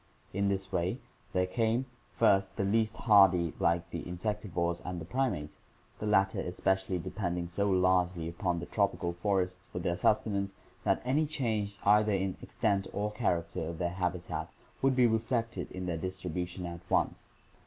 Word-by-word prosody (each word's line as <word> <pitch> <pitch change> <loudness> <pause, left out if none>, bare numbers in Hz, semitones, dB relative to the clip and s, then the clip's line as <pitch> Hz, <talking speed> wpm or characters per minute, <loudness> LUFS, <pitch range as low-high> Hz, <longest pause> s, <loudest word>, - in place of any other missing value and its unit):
In 100 +1 +1
this 95 -1 -1
way 90 +6 0 0.3
there 90 0 +2
came, 115 +5 +1 0.3
first, 100 -4 +3
the 100 - 0
least 110 +2 +1
hardy 95 -6 +5
like 85 0 +1
the - - -3
insectivores 90 -2 -2
and 85 -3 -5
primates, 120 - -1 0.4
the 105 - -3
latter 95 -2 +3
especially 95 +1 0
depending 90 -1 -3
so 100 +4 0
largely 90 -2 +2
upon 85 +1 -1
the 85 - -5
tropical 90 -4 0
forests 90 0 -1
for - - -8
their 85 -1 0
sustenance 100 0 +1 0.3
that - - +2
any 150 +5 +2
change 110 -8 -1
either 105 +1 +5
in 95 -1 0
extent 100 -2 0
or 105 +1 -1
char 105 -6 +1
acter 80 -1 -5
of 85 - -5
their 85 +1 0
habitat 90 -1 -2 0.3
would 135 -1 +3
be 125 -1 +5
reflected 115 +1 0
in 95 0 -5
their 85 -2 -1
distribution 90 0 -4
at 85 0 -6
once. - - 0
95 Hz, 160 wpm, -31 LUFS, 90-105 Hz, 0.4 s, hardy